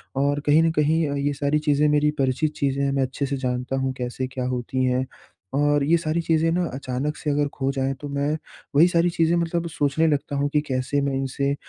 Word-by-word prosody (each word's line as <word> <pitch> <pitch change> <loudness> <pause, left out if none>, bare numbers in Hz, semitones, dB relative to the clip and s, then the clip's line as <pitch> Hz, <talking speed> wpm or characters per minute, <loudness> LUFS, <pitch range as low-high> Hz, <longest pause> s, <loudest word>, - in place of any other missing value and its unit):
और 140 +1 +1
कहीं 150 +2 +5
न 165 - +3
कहीं 155 +1 +2
अ, 140 - -2
ये 145 +1 0
सारी 145 +2 0
चीज़ें 150 0 +2
मेरी 150 0 +3
परिचित 135 +4 +1
चीज़ें 140 0 0
हैं 140 - +1
मैं 135 -1 +1
अच्छे 130 +2 -2
से 140 +1 -2
जानता 125 0 -2
हूँ 135 0 0
कैसे 125 +1 -3
क्या 130 -1 -4
होती 125 +1 -2
हैं। 130 +1 +1 0.5
और 145 +1 +2
ये 165 +4 +4
सारी 165 0 -1
चीज़ें 165 0 +2
ना 175 +1 +1
अचानक 135 +2 -3
से 150 - -3
अगर 145 0 +1
खो 135 0 -1
जाएँ 135 0 -1
तो 145 - -5
मैं 140 +1 -1 0.5
वही 160 +5 +7
सारी 175 0 +2
चीज़ें 170 -1 +2
मतलब 170 0 -1
सोचने 150 +1 +1
लगता 145 -1 -1
हूँ 140 +1 +1
कि 150 - +3
कैसे 130 +2 0
मैं 140 -1 -1
इनसे 135 +1 -1
145 Hz, 225 wpm, -24 LUFS, 135-155 Hz, 0.5 s, वही